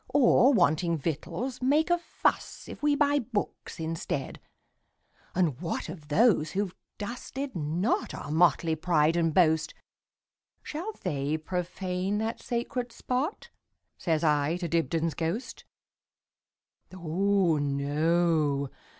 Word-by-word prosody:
Or, 270 Hz, -1 st, +5 dB
wanting 170 Hz, -, +2 dB
victuals, 170 Hz, -, -3 dB
make 295 Hz, +6 st, +3 dB
a 350 Hz, -, +3 dB
fussIf 340 Hz, -, -2 dB
we 295 Hz, -1 st, +3 dB
buy 290 Hz, 0 st, +3 dB
books 220 Hz, -7 st, -4 dB
instead? 160 Hz, -4 st, -3 dB, 0.9 s
And 165 Hz, -6 st, +1 dB
what 165 Hz, -3 st, -3 dB
of 155 Hz, -3 st, -9 dB
those 160 Hz, -1 st, +3 dB
who 200 Hz, +2 st, +1 dB
've 185 Hz, -, -10 dB, 0.2 s
dusted 250 Hz, +5 st, -5 dB
notOur 160 Hz, -1 st, -1 dB
motley 160 Hz, 0 st, +3 dB
pride 160 Hz, -1 st, +2 dB
and 165 Hz, -1 st, +2 dB
boast,—Shall 180 Hz, -, -3 dB
they 145 Hz, +2 st, -1 dB
profane 180 Hz, +3 st, -2 dB
that 220 Hz, +2 st, -2 dB
sacred 240 Hz, 0 st, -3 dB
spot?"Says 250 Hz, -, -4 dB
I 150 Hz, +1 st, +2 dB
to 175 Hz, -1 st, -3 dB
Dibdin's 165 Hz, 0 st, 0 dB
ghost."Oh, 180 Hz, -, -3 dB
no! 145 Hz, 0 st, +1 dB
175 Hz, 100 wpm, -28 LUFS, 155-230 Hz, 0.9 s, Or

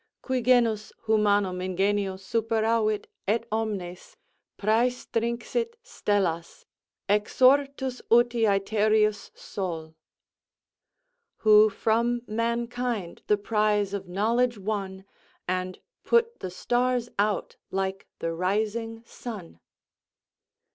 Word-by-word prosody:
Qui 260 Hz, -1 st, -1 dB
genus 230 Hz, -3 st, +3 dB
humanum 205 Hz, -4 st, +2 dB
ingenio 195 Hz, +1 st, 0 dB
superavit, 220 Hz, +1 st, 0 dB, 0.2 s
et 230 Hz, +3 st, +1 dB
omnes 200 Hz, -5 st, -4 dB, 0.4 s
Præstinxit 235 Hz, -, 0 dB
stellas, 195 Hz, -, -2 dB, 0.4 s
exortus 260 Hz, +5 st, +2 dB
uti 240 Hz, 0 st, +4 dB
æthereus 210 Hz, +1 st, +2 dB
Sol. 165 Hz, -5 st, -5 dB, 1.5 s
"Who 215 Hz, 0 st, +8 dB
from 235 Hz, +3 st, 0 dB
mankind 235 Hz, -3 st, -2 dB
the 210 Hz, -, +4 dB
prize 210 Hz, -1 st, +1 dB
of 195 Hz, -2 st, -4 dB
knowledge 230 Hz, +5 st, +1 dB
won, 195 Hz, -2 st, -4 dB, 0.4 s
And 185 Hz, 0 st, -2 dB, 0.3 s
put 470 Hz, 0 st, +2 dB
the 185 Hz, -, -4 dB
stars 245 Hz, +5 st, 0 dB
out 205 Hz, -2 st, 0 dB
like 195 Hz, 0 st, -3 dB
the 165 Hz, 0 st, -3 dB
rising 220 Hz, +5 st, -1 dB
sun." 205 Hz, -, -9 dB
215 Hz, 85 wpm, -27 LUFS, 195-235 Hz, 1.5 s, Who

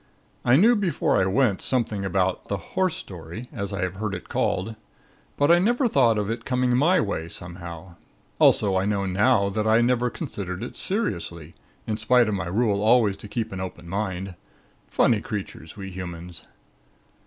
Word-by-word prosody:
I 120 Hz, -, +5 dB
knew 220 Hz, -, +6 dB
before 190 Hz, -, +1 dB
I 95 Hz, -, +2 dB
went, 105 Hz, 0 st, +2 dB
something 110 Hz, -6 st, -1 dB
about 95 Hz, -1 st, 0 dB
the 100 Hz, -, -2 dB
'horse 185 Hz, -, -1 dB
story,' 95 Hz, -, -8 dB
as 100 Hz, -2 st, -4 dB
I 100 Hz, -3 st, -3 dB
have 90 Hz, +1 st, -3 dB
heard 105 Hz, -1 st, -2 dB
it 90 Hz, -, -9 dB
called; 110 Hz, +5 st, -1 dB, 0.6 s
but 145 Hz, +3 st, +4 dB
I 175 Hz, -, +6 dB
never 240 Hz, +7 st, +2 dB
thought 120 Hz, -, +3 dB
of 105 Hz, -1 st, -1 dB
it 115 Hz, +2 st, -3 dB
coming 125 Hz, -1 st, +1 dB
my 170 Hz, +8 st, +4 dB
way, 90 Hz, -, -2 dB
somehow. 85 Hz, 0 st, -9 dB, 0.4 s
Also 100 Hz, -2 st, +4 dB
I 95 Hz, -, +1 dB
know 100 Hz, -1 st, 0 dB
now 100 Hz, +2 st, +2 dB
that 105 Hz, +2 st, -1 dB
I 110 Hz, +1 st, +5 dB
never 125 Hz, 0 st, +2 dB
considered 95 Hz, -3 st, -5 dB
it 120 Hz, -, -7 dB
seriously 85 Hz, -, -3 dB, 0.3 s
in 110 Hz, -, -2 dB
spite 120 Hz, +2 st, +3 dB
of 110 Hz, -, -1 dB
my 95 Hz, -3 st, -2 dB
rule 100 Hz, +1 st, +1 dB
always 110 Hz, -2 st, +4 dB
to -, -, -8 dB
keep 115 Hz, +1 st, -3 dB
an 95 Hz, -, -5 dB
open 90 Hz, -2 st, -7 dB
mind. 95 Hz, 0 st, -3 dB, 0.5 s
Funny 110 Hz, -3 st, +2 dB
creatures, 100 Hz, -5 st, -6 dB
we 95 Hz, -1 st, -7 dB
humans! 90 Hz, -1 st, -8 dB
105 Hz, 175 wpm, -24 LUFS, 95-125 Hz, 0.6 s, knew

